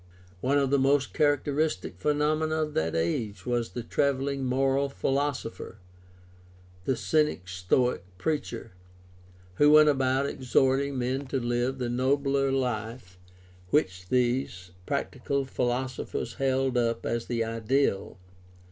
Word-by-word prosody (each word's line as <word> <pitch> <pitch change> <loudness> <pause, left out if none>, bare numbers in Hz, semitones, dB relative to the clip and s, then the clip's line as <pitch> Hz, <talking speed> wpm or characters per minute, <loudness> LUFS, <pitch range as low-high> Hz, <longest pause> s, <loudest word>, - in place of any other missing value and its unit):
One 135 +8 +1
of 135 -2 +1
the 140 - +4
most 135 +1 +2
characteristic 145 - 0
phenomena 155 +2 +1
of 150 -1 -5
that 80 +1 0
age 90 +4 -2
was 120 -2 -1
the 120 - -6
traveling 140 +1 0
moral 135 +2 +1
philosopher, 135 -5 -2 1.1
the 135 - +1
Cynic 150 - +1
Stoic 90 +8 0
preacher, 130 -3 -3 0.9
who 145 - +6
went 155 0 +8
about 135 -1 +2
exhorting 135 +1 +1
men 130 +3 -2
to 135 0 -1
live 120 +2 -1
the 125 -2 -2
nobler 135 +2 +1
life 115 -7 -3 0.5
which 90 -10 0
these 120 -8 0 0.2
practical 140 0 -2
philosophers 125 -2 -2
held 130 -1 +1
up 115 -1 -1
as 115 0 -2
the 115 -2 0
ideal. 115 -2 0
130 Hz, 120 wpm, -28 LUFS, 120-140 Hz, 1.1 s, went